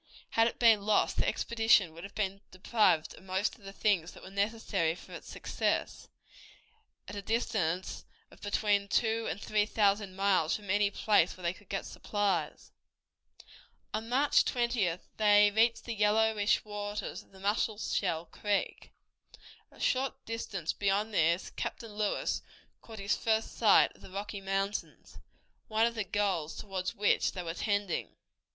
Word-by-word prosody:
Had 225 0 +4
it - - -4
been 225 -3 +5
lost 210 +1 +2
the - - +1
expedition 225 -7 +3
would 170 +1 -11
have 200 - -10
been 195 -1 -2
deprived 185 -4 +2
of - - -15
most 190 +2 -1
of - - -22
the 195 - -8
things 195 -4 0
that - - -14
were 190 - -10
necessary 200 -5 0
for - - -14
its - - -9
success, - - -2 1.0
at 205 - -7
a 200 - -4
distance 195 -5 -1 0.3
of - - -18
between 205 -1 +1
two 225 +2 +1
and - - -4
three 210 0 +1
thousand 200 -3 +1
miles 190 -5 +2
from 205 -3 -5
any 205 0 +3
place 200 -4 +2
where 185 - -13
they 170 0 0
could 200 0 -19
get 195 - -3
supplies. 205 -2 -2 1.2
On 220 +2 -3
May 265 +4 +3
20th 235 -11 +2 0.2
they 205 -1 +6
reached 225 +1 +2
the 235 - -3
yellowish 210 0 +2
waters 205 0 -5
of - - -24
the 190 - -16
Musselshell 200 -4 -1 0.2
River. 205 -2 +1 1.0
A - - -19
short 265 +1 -1
distance 210 -7 -3
beyond 205 +2 0
this 170 0 +2
Captain 225 -3 -5
Lewis 210 0 -1 0.4
caught 225 -1 -11
his 200 0 0
first 220 -1 0
view 225 - +1 0.3
of - - -22
the - - -12
Rocky 200 +2 -5
Mountains, 195 +1 -3 0.5
one 220 +1 +2
of 235 - 0
the 220 -2 -2
goals 190 -5 -1
toward 190 -3 -3
which 205 +1 +1
they 180 - -5
were 165 -1 -4
tending. 205 -1 -2
205 Hz, 160 wpm, -31 LUFS, 195-220 Hz, 1.2 s, they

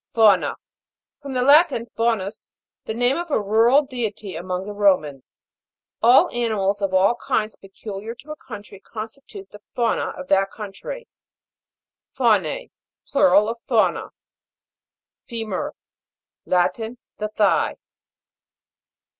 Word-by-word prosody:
FAU'NA. 215 -5 +4 0.7
From 275 -2 -6
the 250 -1 +1
Latin, 285 -3 +5
faunus, 225 -4 -2 0.3
the - - -3
name 245 +3 +2
of 345 0 -4
a 290 - +2
rural 225 +7 +4
deity 220 - -5
among 180 +2 -4
the 210 - -6
Romans. 180 -10 0 0.6
All 240 +3 +6
animals 210 -4 0
of 195 -1 0
all 190 +4 +4
kinds 215 0 -1
peculiar 200 +3 -8
to 270 +6 -12
a - - -5
country 210 -7 -11
con 215 +2 -6
stitute 220 -6 -13
the 210 - -13
fauna 235 -2 +1
of 275 - -8
that 195 0 +3
country. 225 - -8 1.1
FAU'N.E. - - +1 0.4
Plural 205 -5 +4
of 230 +1 -4
Fauna. - - +1 1.2
FE'MUR. 225 -5 -3 0.7
Latin. 220 +6 0 0.2
The 215 - -1
thigh. 210 -2 +1
215 Hz, 120 wpm, -22 LUFS, 195-240 Hz, 1.2 s, All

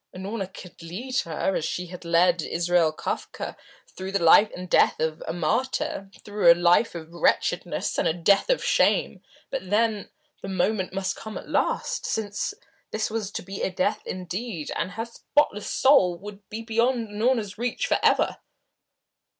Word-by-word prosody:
Unorna 195 +1 -4
could 180 -2 -12
lead 225 +11 -3
her, 170 +3 -1
as - - -1
she 180 +3 -3
had 180 0 -10
led 170 +1 +3
Israel 170 0 +2
Kafka, 155 - -5 0.4
through 190 +1 -5
the 195 -3 0
life 205 +6 +7
and 180 0 -7
death - - +4
of 160 0 -1
a - - -1
martyr, 240 - -1 0.2
through 205 -4 +5
a - - +7
life 175 +4 +3
of 165 0 -8
wretchedness 170 - 0
and - - +2
a - - +3
death 185 - +3
of - - +2
shame, - - +2 0.3
but 230 -9 -4
then, 215 0 +1 0.3
the - - -6
moment 190 +1 0
must 190 0 -2
come 220 -1 -7
at - - -9
last, - - 0
since 215 - -2 0.3
this 215 0 -2
was 220 -3 -2
to - - -6
be 195 +2 -7
death 195 +3 0
indeed, 185 -1 -5
and 180 +2 -2
her 225 +2 -3
spotless 235 -2 0
soul 190 -11 +4
would 200 +1 -11
be 220 +2 -6
beyond 230 0 +1
Unorna's 215 -1 0
reach 245 0 -1
forever. - - +2
195 Hz, 165 wpm, -25 LUFS, 175-220 Hz, 0.4 s, life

